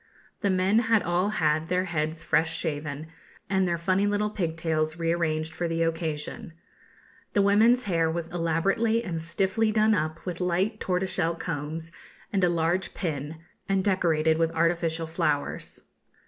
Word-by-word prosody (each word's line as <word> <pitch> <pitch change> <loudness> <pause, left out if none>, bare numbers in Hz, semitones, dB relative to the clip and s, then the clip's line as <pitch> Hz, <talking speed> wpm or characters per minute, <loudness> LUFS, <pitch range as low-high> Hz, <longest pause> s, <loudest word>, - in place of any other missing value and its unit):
The 200 - 0
men 190 +3 +3
had 225 -2 +2
all 175 +3 +1
had 155 -5 +1
their 180 +1 +1
heads 160 -2 -2
fresh 160 +1 +1
shaven, 150 -2 -3 0.5
and 190 -1 +2
their 170 -1 0
funny 185 +4 +1
little 205 +1 0
pigtails 160 -4 -1
rearranged 165 -2 -1
for 175 - -2
the 165 0 0
occasion. 165 +4 -3 0.8
The 200 - +3
women's 225 +5 +4
hair 165 -5 +1
was 165 0 -3
elaborately 185 +7 +1
and 165 -6 -3
stiffly 190 +6 +1
done 215 0 +3
up 155 -4 -2
with 180 0 -4
light 185 +5 0
tortoiseshell 180 -2 0
combs 160 0 -5 0.4
and 195 -2 +2
a 180 - +5
large 170 +2 0
pin, 155 -2 -4 0.3
and 195 -1 +2
decorated 160 -5 +2
with 165 -1 +3
artificial 165 -1 +1
flowers. 150 -2 -2
170 Hz, 145 wpm, -27 LUFS, 160-190 Hz, 0.8 s, a